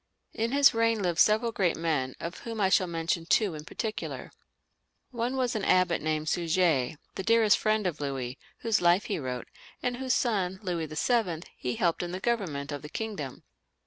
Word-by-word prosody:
'* - - -45
In 230 - 0
his 280 0 +6
reign 230 -2 +2
lived 175 -2 0
several 220 +2 +4
great 190 -6 +1
men, 150 -6 -1
of 170 +1 -6
whom 230 -2 -6
I 195 -2 +3
shall 185 -1 +3
mention 165 0 -2
two 205 -2 +3
in 150 0 -8
particular. 220 +5 -5 0.8
One 245 +2 -2
was 250 -2 0
an 215 - -1
abbot 185 -3 +3
named 155 0 -1
Suger, 165 -6 +1 0.2
the - - -4
dearest 225 0 +5
friend 215 -1 +1
of 160 -5 -2
Louis, 135 -2 -3 0.2
whose 225 -3 +1
life 175 +3 +4
he 200 - -2
wrote, 125 -3 -4 0.4
and 250 -1 -1
whose 260 -1 0
son, 190 -6 0
Louis 170 -4 -2
VlL, 175 - 0
he 125 -1 -3
helped 170 -2 +1
in 175 0 -4
the 185 - -3
government 180 -11 -2
of 145 -1 -4
the 150 - -9
kingdom. 165 - -5
180 Hz, 190 wpm, -28 LUFS, 155-220 Hz, 0.8 s, his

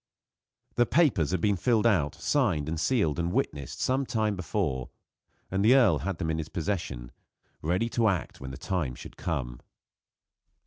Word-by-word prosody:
The 120 -1 +4
papers 120 - +3
had 95 -2 -1
been 100 +1 +3
filled 115 +3 +2
out, 85 -11 +2
signed, 80 - 0
sealed 85 - +1
and 85 0 0
witnessed 70 -6 -2
some 130 +2 +1
time 110 -2 0
before, 85 - -2 0.6
and 95 +1 +1
the 120 +5 +6
earl 105 - +5
had 95 +2 -3
them 80 -1 -1
in 80 - -1
his 80 -1 -5
possession, 85 -10 -3 0.5
ready 90 +8 0
to 115 -1 +2
act 95 -8 -2
when 65 - -6
the 65 - -7
time 80 -10 -2
should - - -11
come. 65 -8 -3
90 Hz, 165 wpm, -28 LUFS, 75-110 Hz, 0.6 s, the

